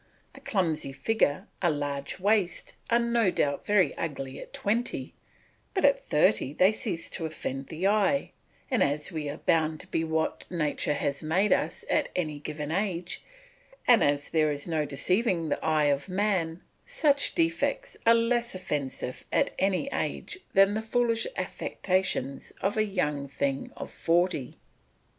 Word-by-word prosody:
A - - -12
clumsy 160 - -1
figure, 185 -1 +1 0.2
a 175 - +3
large 145 0 -3
waist, 200 -3 +1 0.2
are 235 - +5
no 235 -3 +2
doubt 145 -5 0
very 200 -7 +3
ugly 135 -4 -4
at - - -10
twenty, 230 +4 -1 0.6
but 380 - +3
at 280 - +4
thirty 150 -3 +2
they 185 +5 +5
cease 215 -6 -3
to 165 -3 -3
offend 135 -3 -5
the 165 +3 -4
eye, 215 +7 +2 0.4
and 255 - +2
as 145 +4 +1
we 155 -3 -3
are 145 - -5
bound 160 -2 +1
to - - -9
be 165 -3 -1
what 160 0 -1
nature 150 -3 0
has 140 0 -2
made 180 +7 +3
us - - -2
at - - +1
any 155 -5 -2
given 150 0 -5
age, 180 -1 -2 0.6
and 235 -6 +7
as 145 0 +1
there 155 -2 +3
is 145 +2 -5
no 160 -3 0
deceiving 175 - 0
the - - -2
eye 155 -2 +3
of 140 +6 -5
man, 185 -4 0 0.2
such 300 -12 +2
defects 340 +9 0
are 230 0 +6
less 235 -1 +1
offensive 140 -7 -3
at - - +2
any 195 +6 +1
age 355 - -3 0.2
than 195 +1 +6
the 220 - -1
foolish 230 0 +1
affectations 185 -8 -1
of 195 - 0
a 215 - +3
young 150 -9 -1
thing 140 0 -2
of - - -6
forty. 165 -5 0
175 Hz, 155 wpm, -28 LUFS, 150-215 Hz, 0.6 s, and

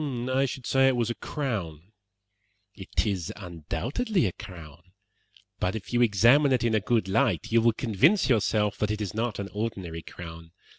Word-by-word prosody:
"I 135 +1 +2
should 130 -1 -7
say 135 0 +4
it 135 - +3
was 120 -1 0
a - - -1
crown." 100 - -4 0.8
"It 95 +2 -2
is 95 -6 -2
undoubtedly 105 - -2
a 95 - 0
crown; 85 -7 -11 0.8
but 90 +4 0
if 110 +2 -7
you 120 - +3
examine 120 +6 +5
it 125 -2 +2
in 115 -1 +1
a 110 - +4
good 110 -1 0
light, 95 - +1
you 115 0 +4
will 115 0 +4
convince 135 - +3
yourself 105 -4 +1
that 105 - 0
it 105 0 -2
is 105 -3 -3
not 115 0 -2
an 100 -1 -5
ordinary 95 -6 -4
crown. 85 0 -10
110 Hz, 180 wpm, -27 LUFS, 95-120 Hz, 0.8 s, examine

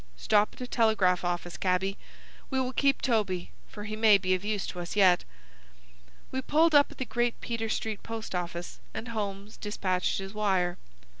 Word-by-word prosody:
Stop 210 - +2
at - - -13
a - - -2
telegraph 215 -7 +2
office, 175 0 -2
cabby! 190 +1 0 0.5
We 265 - 0
will 260 0 -1
keep 275 0 +2
Toby, 205 -8 0 0.2
for 210 - -9
he 215 +1 -4
may 215 -2 +6
be 185 -1 0
of 185 +1 -1
use 210 -1 -1
to 180 - -6
us 175 +2 -5
yet." 185 -3 +5 1.1
We 260 - -1
pulled 315 +4 +3
up 290 -1 +6
at - - -13
the 260 - -2
Great 240 -1 -1
Peter 230 -1 -3
Street 215 -1 -2
post 225 -2 -6
office, 175 -1 -4 0.2
and 230 - -5
Holmes 205 -2 -4
despatched 185 -3 -1
his 195 +1 -5
wire. 190 -4 +1
210 Hz, 180 wpm, -29 LUFS, 185-230 Hz, 1.1 s, may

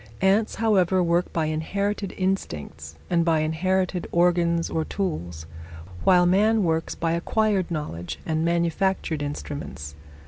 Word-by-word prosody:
Ants, 200 +3 +2
however, 190 -5 +2
work 170 +1 +1
by 160 -2 0
inherited 200 +6 -2
instincts 80 - -3
and 170 -1 +2
by 165 -2 +2
inherited 180 +3 0
organs 170 -1 +2
or 160 - -1
tools, 85 - -4 0.6
while 180 -1 +5
man 210 +4 +3
works 165 -1 -1
by 165 0 -1
acquired 195 +3 +1
knowledge 150 - -4
and 160 -1 0
manufactured 170 -1 0
instruments. 145 - -6
170 Hz, 125 wpm, -24 LUFS, 155-190 Hz, 0.6 s, while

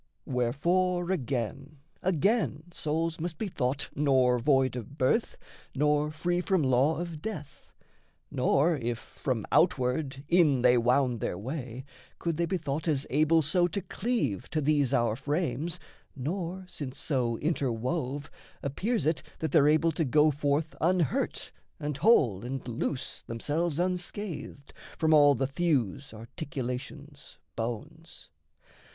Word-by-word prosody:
Wherefore, 175 +9 +1
again, 135 - -3 0.2
again, 190 - +1
souls 165 +1 -2
must 170 -1 -4
be 220 - -2
thought 135 -6 -2
Nor 130 -4 +3
void 135 0 +2
of 125 +4 -7
birth, 135 - +1 0.4
nor 150 +1 +2
free 175 +3 -1
from 185 -3 +1
law 130 +4 +3
of 170 -3 -5
death; 155 -10 -7 0.6
Nor, 145 +5 +2
if, 120 -2 -2
from 120 -2 -4
outward, 135 -3 +1
in 160 -8 +4
they 125 0 +6
wound 125 0 +2
their 90 - -2
way, 130 - -5 0.3
Could 170 -2 -2
they 170 0 +1
be 185 - 0
thought 150 0 -3
as 145 -3 +1
able 155 +3 +4
so 175 +4 +3
to 200 - -3
cleave 220 - -2
To 155 - -1
these 145 -3 +2
our 120 -5 +2
frames, 150 +3 -2 0.4
nor, 175 +6 -4
since 140 -7 -6
so 125 -6 0
interwove, 140 0 -1 0.4
Appears 205 - -1
it 160 0 +1 0.2
that 160 - -3
they're 145 +1 +5
able 155 +2 +3
to 160 +1 -1
go 150 +2 +4
forth 145 +2 0
Unhurt 175 -3 0 0.3
and 150 -1 -3
whole 125 - +4
and 130 +1 -5
loose 125 +3 -3
themselves 150 +7 -1
unscathed 180 -4 -4 0.2
From 160 -1 +3
all 145 -2 +7
the 135 - 0
thews, 140 - 0
articulations, 140 +3 -7 0.2
bones. 145 +9 -6
145 Hz, 135 wpm, -29 LUFS, 130-165 Hz, 0.6 s, all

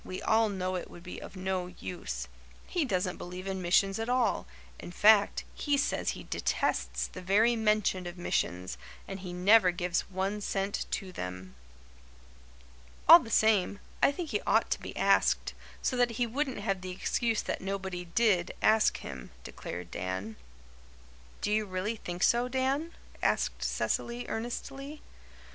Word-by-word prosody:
We 185 - -6
all 220 +2 +3
know 185 -2 -2
it - - -6
would 175 - -12
be 180 - -8
of - - -10
no 185 -1 -2
use. 180 0 -6 0.4
He 345 -5 0
doesn't 185 -5 -1
believe 180 +1 -7
in 190 -1 -3
missions 195 +3 +3
at 225 +2 -2
all 250 - +1 0.3
in - - -8
fact, 205 +2 +5
he 290 -1 0
says 275 - 0
he - - -8
detests - - -1
the 185 - -8
very 210 +6 +4
mention 210 -4 +1
of 175 +1 -7
missions 90 - -2 0.3
and 195 0 -6
he 185 -1 -7
never 185 +2 +5
gives 175 0 -1
one 195 +2 -2
cent 195 0 -2
to 190 -2 -3
them." 90 - -6 1.5
"All 335 +2 +12
the 235 - -8
same, 210 -3 +3 0.2
I - - +6
think 310 +1 -5
he 210 - 0
ought - - +3
to - - +1
be - - -8
asked, - - +3 0.3
so 255 - +1
that 245 -1 +3
he 245 - +2
wouldn't 260 -1 -2
have 195 -2 -1
the 185 - -6
excuse 225 +4 0
that - - -3
nobody 190 -2 -4
DID 185 -1 +2
ask 220 0 +4
him," 65 -3 -8
declared 90 -1 -7
Dan. 95 +4 -4 1.1
"Do 210 - -1
you 215 0 +1
really 185 +4 -2
think 175 -2 -4
so, 240 +1 +4
Dan?" 270 +6 -1 0.3
asked - - +1
Cecily 240 +1 -1
earnestly. 275 +5 -5
195 Hz, 160 wpm, -30 LUFS, 180-230 Hz, 1.5 s, All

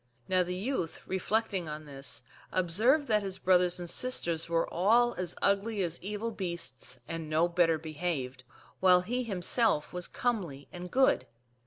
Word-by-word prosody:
Now 185 -1 +3
the 180 0 -2
youth, 195 -4 -3
reflecting 190 -2 -1
on 150 0 -6
this, 135 -2 -5 0.3
^observed 215 - +3
that 215 -5 +2
his 190 -1 -3
brothers 180 -1 +3
and 175 - -5
sisters 170 -8 +1
were 165 0 +1
all 235 +7 +4
as 180 -2 -3
ugly 200 +1 +2
;as 170 -1 -3
evil 210 +4 -3
beasts 170 - -4
and 165 -2 -5
no 160 +2 +3
better 170 -2 +3
behaved, 155 -5 -4 0.4
while 180 -1 +6
he 245 +7 -2
himself 200 -5 +1 0.2
comely 180 - -2
and 180 0 -7
good. 265 +5 +3
180 Hz, 150 wpm, -30 LUFS, 165-210 Hz, 0.4 s, while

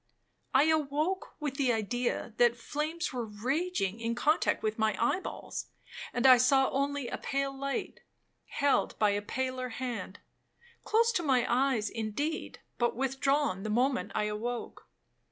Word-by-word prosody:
I 265 - +5
awoke 315 +4 0
with 290 -3 -3
the 265 -3 +2
idea 235 +1 -1
that 240 0 +4
flames 310 +7 -3
were 245 -2 -2
raging 235 - -1
in 230 0 -2
contact 300 +6 +2
with 215 0 -1
my 215 -2 +1
eye 235 +10 +2
balls, - - -6 0.4
and 245 - -1
I 255 -1 +9
saw 265 +2 +4
only 280 -1 -1
a - - -4
pale 275 0 -2
light, 275 0 -3 0.5
held 280 -1 +1
by 210 -1 +3
a 205 0 0
paler 255 +3 -3
hand—close 260 - -3
to 355 - 0
my 265 -6 +2
eyes 250 -3 +2
indeed, 230 +8 -3 0.2
but 240 -1 +1
withdrawn 270 -4 +1
the 215 - -4
moment 250 +4 +1
I 215 - +1
awoke. 225 +3 -4
260 Hz, 145 wpm, -30 LUFS, 230-285 Hz, 0.5 s, I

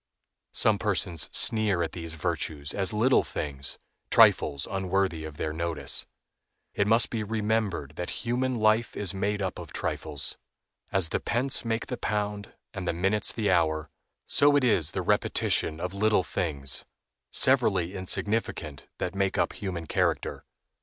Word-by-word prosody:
Some 105 -2 +3
persons 90 -5 0
sneer 105 -6 +2
at 80 - -3
these 80 -2 -6
virtues 80 -3 -2
as 95 -1 0
little 115 +5 +4
things, 70 -2 -4 0.3
trifles 70 -2 +5
unworthy 95 -4 -1
of 75 -1 -9
their 75 +1 -2
notice. 85 0 0 0.7
It 100 - +1
must 115 +1 +4
be 115 -2 -2
remembered 105 -8 -1
that 90 - -4
human 125 +2 0
life 110 +1 +2
is 100 -1 -3
made 100 +1 -1
up 95 - -3
of - - -9
trifles. 75 -2 -3 0.5
As 95 -4 +2
the - - 0
pence 125 +3 +1
make 115 -1 -1
the 125 - -5
pound 105 -2 -3 0.2
and 95 -3 -5
the 85 - +1
minutes 95 +4 +2
the 105 -4 0
hour, 80 -3 +1 0.3
so 145 0 +4
it 145 - +3
is 100 - +3
the - - -2
repetition 80 - +1
of 90 +2 -3
little 105 -1 +2
things, 70 -10 -2 0.5
severally 100 -9 +2
insignificant, 95 -5 -2
that - - -3
make 95 -1 0
up - - +1
human 90 -5 -5
character. - - -1
95 Hz, 150 wpm, -27 LUFS, 80-110 Hz, 0.7 s, trifles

